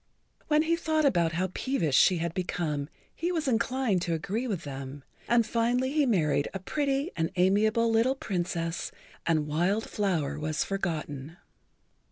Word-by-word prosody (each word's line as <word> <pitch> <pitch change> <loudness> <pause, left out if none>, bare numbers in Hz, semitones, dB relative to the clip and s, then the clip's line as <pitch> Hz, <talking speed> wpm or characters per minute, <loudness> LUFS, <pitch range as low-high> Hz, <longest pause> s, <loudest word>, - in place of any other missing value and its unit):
When 305 0 +4
he 330 +1 +2
thought 315 -2 +1
over 175 -11 +3
how 185 +1 -1
peevish 175 - 0
she 185 - +5
had 170 0 -2
become 160 -5 -2 0.3
he 345 +2 -1
was 320 -5 -1
inclined 235 -4 +1
to 170 -1 0
agree 200 +9 -2
with 195 -7 -3
them, 135 0 -7 0.2
and 235 -1 +4
finally 240 +3 +1
he 295 -2 +2
married 155 - +2
a - - -2
pretty 275 - -1
and 165 -1 0
amiable 210 +5 +3
little 230 +4 +3
Princess 175 -7 -3 0.4
and 155 -3 +2
Wild 175 +8 0
Flower 160 -8 -1
was 155 0 -1
forgotten. 160 -5 -4
190 Hz, 155 wpm, -28 LUFS, 160-250 Hz, 0.4 s, she